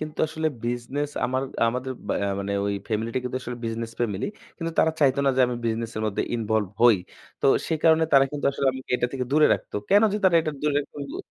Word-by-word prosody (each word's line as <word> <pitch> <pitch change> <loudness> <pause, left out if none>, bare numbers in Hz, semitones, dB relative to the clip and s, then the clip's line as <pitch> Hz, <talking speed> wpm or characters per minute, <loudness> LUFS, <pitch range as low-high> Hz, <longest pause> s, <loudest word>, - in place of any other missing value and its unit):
কিন্তু 155 0 -6
আসলে 160 0 -1 0.2
বিজনেস 125 +5 -2
আমার 130 +1 0 0.3
আমাদের 130 +2 -3 0.3
অ্যা 100 - 0
মানে 100 +1 -3
ওই 100 - 0
ফ্যামিলি 110 +1 -1
টা - - +2
কিন্তু 125 0 -3
আসলে 120 0 -5
বিজনেস 115 0 -3
ফ্যামিলি। 105 -5 -1 0.3
কিন্তু 165 -1 -3
তারা 160 - +4
চাইত 135 -3 +4
না 140 - +4
যে - - +3
আমি 125 - -3
বিজনেস 115 0 -2
এর 110 - -2
মধ্যে 105 - -1
ইনভলভ 110 -3 0
হই। 120 -4 +7 0.4
তো - - +2 0.2
সে 165 - 0
কারণে 160 0 +5
তারা 135 -1 +7
কিন্তু 145 -1 -2
আসলে 140 - -1
আমাকে 130 0 -9
এটা 125 - 0
থেকে 130 -2 -2
দূরে 150 +2 +5
রাখত। - - -9 0.2
কেনো 205 +2 +6
যে 210 - 0
তারা 180 -2 +5
এটা 155 -1 -3
দূরে 150 -1 +1
রাখত 145 - -7
বু - - -6
130 Hz, 230 wpm, -25 LUFS, 115-150 Hz, 0.4 s, হই